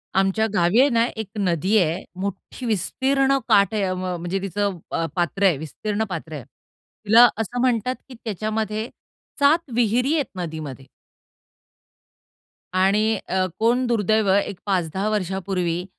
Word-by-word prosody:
आमच्या 195 +3 +2
गावी 175 +4 +3
आहे 275 +2 +6
ना 230 -2 +3
एक 220 -2 -5
नदी 185 +2 +1
आहे. 175 -1 +1 0.2
मोठी 200 +5 -6
विस्तीर्ण 270 +6 +1
काठ 200 +1 +4
आहे. 210 -2 0
अवं 185 -1 -2
म्हणजे 175 +3 -2
तिचं 195 0 -2
अ, 165 - 0
पात्र 175 +3 -1
आहे, 180 -7 +4
विस्तीर्ण 205 +8 -3
पात्र 160 -2 -6
आहे. 145 -4 -6
तिला 225 - +2
असं 235 +3 -3
म्हणतात 250 0 +1
की 255 - -10
त्याच्यामध्ये, 215 +1 -3 0.5
7 300 +3 +3
विहिरी 245 +4 +2
आहेत 290 - +1
नदीमध्ये 155 -7 -6 1.9
आणि 205 +4 +3
अ, 185 0 +1
कोण 240 +3 +2
दुर्दैव, 215 -2 +2
एक 200 -1 0
5-10 190 +1 -1
वर्षापूर्वी 185 -3 -2
200 Hz, 135 wpm, -23 LUFS, 180-225 Hz, 1.9 s, आहे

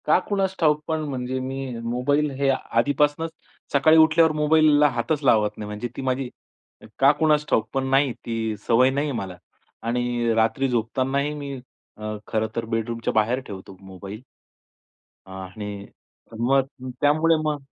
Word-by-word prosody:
का - - +5
कुणास 195 -2 0
ठाऊक, 150 -2 +3
पण 160 -1 0
म्हणजे 130 -1 -3
मी 130 -2 -5
मोबाईल 135 +6 +1
हे 140 -1 +2
आधीपासूनच 145 +5 +1 0.4
सकाळी 155 +3 +5
उठल्यावर 160 0 +5
मोबाईलला 150 -1 +4
हातच 140 +4 -2
लावत 110 -5 +4
नाही. 105 - -6
म्हणजे 105 +3 -4
ती - - -3
माझी 130 0 -1 0.7
का 135 +1 +7
कुणास 150 -2 +3
ठाऊक, 110 -1 +2
पण 135 0 0
नाही, 135 -1 +3
ती 110 -1 -2
सवय 125 +3 +5
नाही 140 +3 -1
आहे 130 - -3
मला. 95 -3 -6 0.4
आणि 120 0 0
रात्री 115 +4 +1
झोपतानाही 130 +5 0
मी 145 -2 -6 0.4
अ, 105 0 -5
खरंतर 110 +1 -2
बेडरूमच्या 115 +1 -2
बाहेर 110 +4 +2
ठेवतो 95 -1 -9
मोबाईल. 95 +3 -9 1.1
आणि 100 +2 -7 0.5
मग 130 +1 0
त्यामुळे 155 +3 +4
मग 150 -2 -2
130 Hz, 140 wpm, -24 LUFS, 115-145 Hz, 1.1 s, का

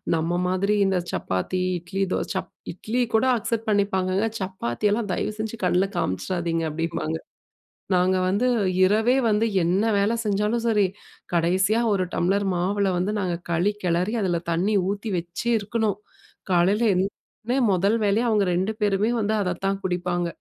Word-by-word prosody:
நம்ம 165 +1 -1 0.2
மாதிரி 195 +3 +1
இந்த 190 -1 +1
சப்பாத்தி, 95 - -2 0.2
இட்லி, 195 +3 -5
தோசை - - -2
சப் - - -3 0.2
இட்லி 220 +8 -2
கூட 220 - +3
அக்செப்ட் 230 0 -3
பண்ணிப்பாங்கங்கல்ல? 200 0 +1
சப்பாத்தியெல்லாம் 195 - -1
தயவு 215 - -2
செஞ்சு 220 +1 -4
கண்ணுல 180 +2 +2
காமிச்சிடாதீங்க 165 - -1
அப்பிடிம்பாங்க. 160 0 -2 0.8
நாங்க 185 +1 +3
வந்து 205 +7 +1 0.4
இரவே 220 +6 +3
வந்து 215 +2 +2 0.2
என்ன 185 +5 +2 0.2
வேல 205 +3 +2
செஞ்சாலும் 210 +3 0
சரி, 210 -3 +3 0.5
கடைசியா 190 +6 +2
ஒரு 185 -1 +1
டம்ளர் 195 +3 +1
மாவுல 195 +2 0
வந்து 195 +4 0
நாங்க 180 -3 -1
களி 175 +5 +2
கிளறி 180 +6 +1
அதில 175 -3 0
தண்ணீ 195 +5 +1
ஊத்தி 205 +2 -4
வச்சு 175 +7 -5
இருக்கணும். 210 -1 -1 0.5
காலையில 190 +6 +3
எந்திச்சசோனே 215 +6 -3
முதல் 195 +4 +2
வேலையா 210 +4 +2
அவுங்க 210 -2 +3
2 190 +5 0
பேருமே 205 +2 +2
வந்து 210 +1 0
அதத்தான் 195 +2 -1
குடிப்பாங்க. 175 -1 -1
195 Hz, 140 wpm, -24 LUFS, 180-210 Hz, 0.8 s, கூட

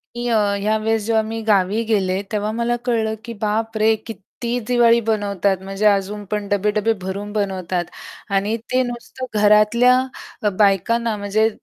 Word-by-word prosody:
मी 240 0 -3
अ, 225 -2 +3 0.2
या 215 +2 +1
वेळेस 220 0 -1
जेव्हा 225 0 +2
मी 225 0 -4
गावी 205 +1 +2
गेले, 195 -4 0
तेव्हा 210 0 -1
मला 240 +1 +1
कळलं, 225 -3 0
की 235 - -6
बापरे! 220 +1 +1
किती 235 +2 -5
दिवाळी 235 -1 +4
बनवतात 205 -3 0
म्हणजे 195 +2 -3
अजून 205 +1 0
पण 210 -1 -2
डबे-डबे 210 +2 +1
भरून 200 +3 -5
बनवतात. 190 -4 -2 0.4
आणि 200 +2 0 0.2
ते 255 - +3
नुसतं 245 +1 -6
घरातल्या 215 +4 +5 0.5
अ, 210 - +3
बायकांना 215 +3 +2
म्हणजे 210 +2 +1
215 Hz, 150 wpm, -20 LUFS, 200-225 Hz, 0.5 s, घरातल्या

